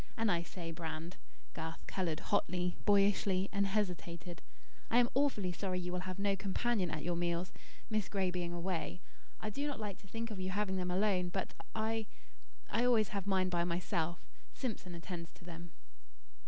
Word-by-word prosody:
And 225 Hz, -2 st, +3 dB
I 170 Hz, -1 st, +3 dB
say, 170 Hz, -1 st, -5 dB
Brand," 165 Hz, +1 st, -4 dB, 0.4 s
Garth 160 Hz, 0 st, -5 dB
coloured 170 Hz, -5 st, -1 dB
hotly, 180 Hz, -3 st, +2 dB
boyishly, 200 Hz, -1 st, +4 dB
and 200 Hz, -1 st, +3 dB
hesitated, 180 Hz, -4 st, -1 dB, 0.5 s
"I 235 Hz, -, +5 dB
am 245 Hz, -1 st, +6 dB
awfully 255 Hz, -9 st, +3 dB
sorry 185 Hz, 0 st, -1 dB
you 180 Hz, 0 st, -2 dB
will 180 Hz, +1 st, -2 dB
have 185 Hz, -, -3 dB
no 200 Hz, 0 st, +2 dB
companion 195 Hz, 0 st, +1 dB
at 155 Hz, -2 st, -2 dB
your 175 Hz, 0 st, +1 dB
meals, 170 Hz, +1 st, 0 dB, 0.3 s
Miss 215 Hz, -3 st, 0 dB
Gray 190 Hz, -3 st, +2 dB
being 175 Hz, -1 st, -1 dB
away. 175 Hz, 0 st, -2 dB, 0.4 s
I 215 Hz, -, -2 dB
do 285 Hz, +7 st, -1 dB
not 285 Hz, -, -2 dB
like 205 Hz, -4 st, -3 dB
to 200 Hz, -, -16 dB
think 225 Hz, +3 st, -3 dB
of 205 Hz, -, -4 dB
you 185 Hz, 0 st, -1 dB
having 190 Hz, 0 st, +1 dB
them 180 Hz, -1 st, 0 dB
alone, 185 Hz, -1 st, +3 dB
but 190 Hz, +1 st, -2 dB, 0.2 s
I 220 Hz, 0 st, 0 dB, 0.6 s
I 230 Hz, -, +2 dB
always 230 Hz, -4 st, +5 dB
have 200 Hz, -1 st, -2 dB
mine 190 Hz, -2 st, +3 dB
by 175 Hz, -1 st, +2 dB
myself. 170 Hz, -1 st, 0 dB, 0.3 s
Simpson 205 Hz, -8 st, -3 dB
attends 170 Hz, -1 st, -5 dB
to 175 Hz, -, -16 dB
them." 170 Hz, 0 st, -8 dB
185 Hz, 180 wpm, -36 LUFS, 175-205 Hz, 0.6 s, am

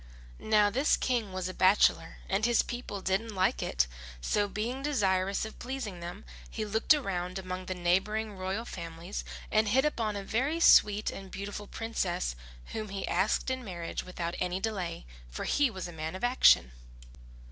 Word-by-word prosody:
Now 210 Hz, -1 st, +3 dB
this 270 Hz, +7 st, +3 dB
King 235 Hz, -6 st, 0 dB
was 185 Hz, -1 st, -3 dB
a 185 Hz, -, -5 dB
bachelor 185 Hz, -3 st, +3 dB
and 195 Hz, +3 st, 0 dB
his 240 Hz, 0 st, +4 dB
people 240 Hz, -5 st, -5 dB
didn't 205 Hz, +3 st, -1 dB
like 185 Hz, 0 st, +2 dB
it; -, -, +1 dB, 0.3 s
so 205 Hz, -, +1 dB
being 230 Hz, +6 st, -3 dB
desirous 195 Hz, -9 st, +1 dB
of 220 Hz, -, -10 dB
pleasing 245 Hz, -8 st, -5 dB
them, 175 Hz, +4 st, -7 dB, 0.2 s
he 220 Hz, -, -3 dB
looked 220 Hz, +8 st, +4 dB
around 185 Hz, -8 st, -3 dB
among 185 Hz, -1 st, -5 dB
the 185 Hz, -, -2 dB
neighbouring 200 Hz, +5 st, 0 dB
royal 190 Hz, +5 st, -3 dB
families 170 Hz, 0 st, -6 dB, 0.3 s
and 215 Hz, 0 st, +3 dB
hit 260 Hz, +7 st, +3 dB
upon 225 Hz, -8 st, 0 dB
a 200 Hz, -, -4 dB
very 270 Hz, +11 st, 0 dB
sweet 210 Hz, -9 st, +6 dB
and 195 Hz, -1 st, -8 dB
beautiful 205 Hz, +2 st, -6 dB
princess, 185 Hz, -, -2 dB, 0.4 s
whom 215 Hz, -1 st, -4 dB
he 195 Hz, 0 st, -4 dB
asked 215 Hz, +6 st, +1 dB
in 260 Hz, 0 st, -3 dB
marriage 175 Hz, -5 st, -5 dB
without 175 Hz, -2 st, -4 dB
any 180 Hz, +1 st, -1 dB
delay, 190 Hz, -, -3 dB, 0.2 s
for -, -, -5 dB
he 290 Hz, -2 st, +2 dB
was 190 Hz, -5 st, -6 dB
a 175 Hz, -, -9 dB
man 160 Hz, +2 st, -4 dB
of 190 Hz, -, -8 dB
action. 245 Hz, -, +5 dB
200 Hz, 170 wpm, -30 LUFS, 185-225 Hz, 0.4 s, sweet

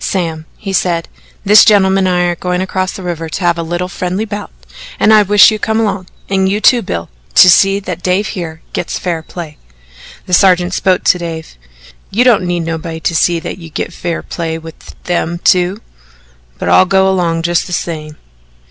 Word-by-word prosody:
"Sam," 165 Hz, -4 st, -3 dB
he 195 Hz, -2 st, -6 dB
said 170 Hz, -3 st, 0 dB, 0.4 s
"this 210 Hz, +2 st, +7 dB
gentleman 195 Hz, -3 st, +3 dB
and 180 Hz, -, +1 dB
I 180 Hz, -, +1 dB
are 175 Hz, 0 st, 0 dB
going 180 Hz, +1 st, -2 dB
across 185 Hz, 0 st, -2 dB
the 190 Hz, -, -8 dB
river 165 Hz, -2 st, -4 dB
to 175 Hz, -, -5 dB
have 175 Hz, -1 st, +1 dB
a -, -, 0 dB
little 175 Hz, +2 st, -3 dB
friendly 185 Hz, +3 st, -3 dB
bout, 205 Hz, -1 st, -6 dB, 0.5 s
and 220 Hz, -, +4 dB
I 215 Hz, -, +7 dB
wish 205 Hz, +1 st, +6 dB
you'd 215 Hz, -1 st, -4 dB
come 220 Hz, 0 st, 0 dB
along 200 Hz, -4 st, -2 dB, 0.2 s
and 190 Hz, -1 st, +1 dB
you, 205 Hz, +2 st, 0 dB
too, 240 Hz, +2 st, +4 dB
Bill, 85 Hz, -, -5 dB, 0.2 s
to -, -, +8 dB
see 195 Hz, +3 st, +4 dB
that 180 Hz, -3 st, -6 dB
Dave 185 Hz, +4 st, 0 dB
here 165 Hz, -5 st, -6 dB
gets -, -, -3 dB
fair 170 Hz, -3 st, -3 dB
play." 160 Hz, -2 st, -9 dB, 0.7 s
The 180 Hz, -, -6 dB
sergeant 180 Hz, 0 st, +3 dB
spoke 185 Hz, -1 st, +1 dB
to 180 Hz, -, +3 dB
Dave. 165 Hz, -, -7 dB, 0.5 s
"You 230 Hz, +5 st, +2 dB
don't 225 Hz, -8 st, +3 dB
need 175 Hz, -1 st, -1 dB
nobody 165 Hz, 0 st, -5 dB
to 170 Hz, -, -1 dB
see 170 Hz, +1 st, +2 dB
that 175 Hz, -, -6 dB
you 165 Hz, -2 st, -10 dB
git 165 Hz, -, -5 dB
fair 170 Hz, -1 st, -4 dB
play 165 Hz, -2 st, -4 dB
with 160 Hz, 0 st, -12 dB
them 175 Hz, -1 st, -2 dB
two 180 Hz, +4 st, +2 dB, 0.8 s
but -, -, -4 dB
I'll -, -, +5 dB
go 190 Hz, 0 st, +2 dB
'long 165 Hz, -3 st, -1 dB
just 170 Hz, 0 st, 0 dB
the -, -, -9 dB
same." 155 Hz, -3 st, -4 dB
180 Hz, 200 wpm, -14 LUFS, 165-195 Hz, 0.8 s, to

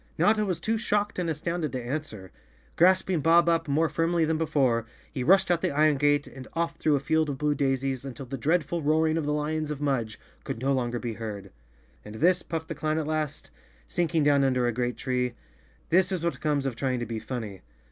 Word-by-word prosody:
Notta 215 Hz, 0 st, +3 dB
was 185 Hz, -5 st, -2 dB
too 225 Hz, 0 st, -1 dB
shocked 205 Hz, -3 st, 0 dB
and 175 Hz, -2 st, -1 dB
astounded 160 Hz, -1 st, -2 dB
to 130 Hz, -, -2 dB
answer. 120 Hz, -, -5 dB, 0.4 s
Grasping 185 Hz, 0 st, +3 dB
Bob 170 Hz, +2 st, +5 dB
Up 165 Hz, -1 st, +2 dB
more 155 Hz, +3 st, +2 dB
firmly 165 Hz, +1 st, +1 dB
than 160 Hz, 0 st, 0 dB
before, 130 Hz, -7 st, +1 dB, 0.3 s
he 130 Hz, -4 st, -2 dB
rushed 190 Hz, +4 st, +4 dB
out 170 Hz, -1 st, +2 dB
the -, -, +1 dB
iron 150 Hz, 0 st, +3 dB
gate 145 Hz, +1 st, +2 dB
and 130 Hz, -1 st, -11 dB
off 165 Hz, 0 st, -1 dB
through 155 Hz, -2 st, +2 dB
a -, -, +1 dB
field 160 Hz, +2 st, +1 dB
of 140 Hz, -, -3 dB
blue 150 Hz, +1 st, +1 dB
daisies, 135 Hz, -2 st, -1 dB
until 135 Hz, -1 st, -7 dB
the 130 Hz, +2 st, -5 dB
dreadful 160 Hz, +5 st, 0 dB
roaring 155 Hz, +1 st, +2 dB
of 160 Hz, -2 st, -1 dB
the -, -, +1 dB
lions 150 Hz, +1 st, -1 dB
of 150 Hz, -2 st, -4 dB
Mudge 130 Hz, -7 st, -1 dB, 0.2 s
could -, -, -5 dB
no 135 Hz, +3 st, +1 dB
longer 120 Hz, -2 st, -1 dB
be 120 Hz, -1 st, -4 dB
heard. 110 Hz, -3 st, -7 dB, 0.5 s
"And 105 Hz, +1 st, -10 dB
this," 180 Hz, +8 st, +3 dB
puffed 160 Hz, -1 st, -5 dB
the -, -, -2 dB
clown 155 Hz, +1 st, -1 dB
at 160 Hz, -, -1 dB
last, 155 Hz, -1 st, -3 dB, 0.4 s
sinking 165 Hz, -2 st, 0 dB
down 145 Hz, -1 st, +4 dB
under 130 Hz, -2 st, +2 dB
a 120 Hz, -, +2 dB
great 120 Hz, 0 st, -2 dB
tree, 125 Hz, -1 st, -1 dB, 0.5 s
"this 185 Hz, +2 st, +3 dB
is 180 Hz, -3 st, -2 dB
what 170 Hz, -, -2 dB
comes 145 Hz, -3 st, 0 dB
of 135 Hz, -3 st, -2 dB
trying 130 Hz, 0 st, -1 dB
to -, -, -2 dB
be 115 Hz, 0 st, -4 dB
funny. 110 Hz, -6 st, -6 dB
150 Hz, 220 wpm, -27 LUFS, 130-165 Hz, 0.5 s, Bob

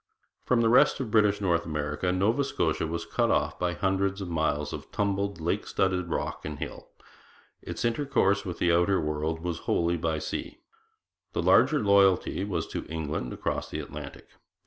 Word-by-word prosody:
From 125 Hz, -2 st, +3 dB
the 115 Hz, -, +3 dB
rest 125 Hz, -, +5 dB
of 125 Hz, -5 st, -4 dB
British 105 Hz, -2 st, +3 dB
North 85 Hz, -4 st, +2 dB
America 75 Hz, +3 st, -2 dB
Nova 105 Hz, +9 st, +2 dB
Scotia 80 Hz, -, -1 dB
was 85 Hz, +1 st, -4 dB
cut -, -, 0 dB
off -, -, 0 dB
by 90 Hz, -1 st, 0 dB
hundreds 95 Hz, +3 st, 0 dB
of 95 Hz, -3 st, -5 dB
miles 75 Hz, -2 st, -1 dB
of -, -, -8 dB
tumbled, 100 Hz, -1 st, -1 dB
lake 80 Hz, +2 st, -1 dB
studded 90 Hz, -2 st, 0 dB
rock -, -, -3 dB
and 75 Hz, -1 st, -5 dB
hill. -, -, -7 dB, 0.7 s
Its -, -, -4 dB
intercourse 115 Hz, -5 st, +1 dB
with 90 Hz, -4 st, -5 dB
the 85 Hz, -1 st, +2 dB
outer 90 Hz, +3 st, +3 dB
world 75 Hz, +1 st, -2 dB
was 85 Hz, -1 st, -3 dB
wholly 85 Hz, +1 st, +2 dB
by 80 Hz, -1 st, -1 dB
sea. 80 Hz, -, -5 dB, 0.8 s
The -, -, -1 dB
larger 155 Hz, -, +5 dB
loyalty 100 Hz, -4 st, +3 dB
was 90 Hz, -5 st, -2 dB
to -, -, -4 dB
England 80 Hz, -5 st, -3 dB
across -, -, -3 dB
the -, -, -4 dB
Atlantic. 75 Hz, -1 st, -8 dB
90 Hz, 170 wpm, -28 LUFS, 80-100 Hz, 0.8 s, rest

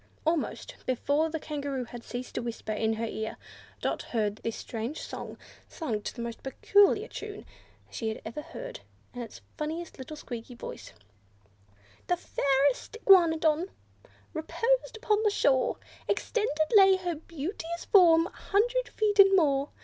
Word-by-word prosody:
Almost 320 Hz, -1 st, -1 dB
before 285 Hz, +5 st, +1 dB
the 320 Hz, 0 st, -3 dB
Kangaroo 285 Hz, -4 st, -3 dB
had 235 Hz, 0 st, -9 dB
ceased 245 Hz, +1 st, -6 dB
to -, -, -2 dB
whisper 235 Hz, -2 st, -5 dB
in 220 Hz, +1 st, +1 dB
her 225 Hz, +1 st, -2 dB
ear, 220 Hz, -1 st, -4 dB, 0.4 s
Dot -, -, -1 dB
heard 210 Hz, -3 st, -1 dB
this 230 Hz, 0 st, -4 dB
strange 235 Hz, +6 st, -5 dB
song, -, -, -7 dB, 0.3 s
sung 230 Hz, -11 st, -3 dB
to -, -, -5 dB
the 235 Hz, -, -5 dB
most 235 Hz, -1 st, -6 dB
peculiar 405 Hz, -, +3 dB
tune 420 Hz, -3 st, -8 dB, 0.5 s
she 225 Hz, -, -3 dB
had 220 Hz, -, -4 dB
ever 230 Hz, +7 st, -5 dB
heard, -, -, -8 dB, 0.3 s
and 245 Hz, -, -6 dB
in 235 Hz, -, -6 dB
the -, -, -12 dB, 0.2 s
funniest 320 Hz, +3 st, -3 dB
of -, -, -23 dB
little 300 Hz, +4 st, -7 dB
squeaky 240 Hz, -2 st, -7 dB
voices. 235 Hz, -, -9 dB, 1.1 s
The 355 Hz, -, +2 dB
fairest 280 Hz, -, +1 dB
Iguanodon 330 Hz, -2 st, +5 dB, 0.6 s
reposed 465 Hz, +9 st, 0 dB
upon 425 Hz, -1 st, +1 dB
the 435 Hz, -, +3 dB
shore 280 Hz, -10 st, +2 dB, 0.3 s
Extended 315 Hz, -9 st, 0 dB
lay 385 Hz, -2 st, +8 dB
her 360 Hz, -2 st, -2 dB
beauteous 330 Hz, +2 st, -5 dB
form, 335 Hz, -5 st, +6 dB
a -, -, -5 dB
hundred 485 Hz, +5 st, 0 dB
feet 420 Hz, -1 st, 0 dB
and 390 Hz, 0 st, +9 dB
more. 280 Hz, -5 st, +3 dB
315 Hz, 155 wpm, -29 LUFS, 250-390 Hz, 1.1 s, and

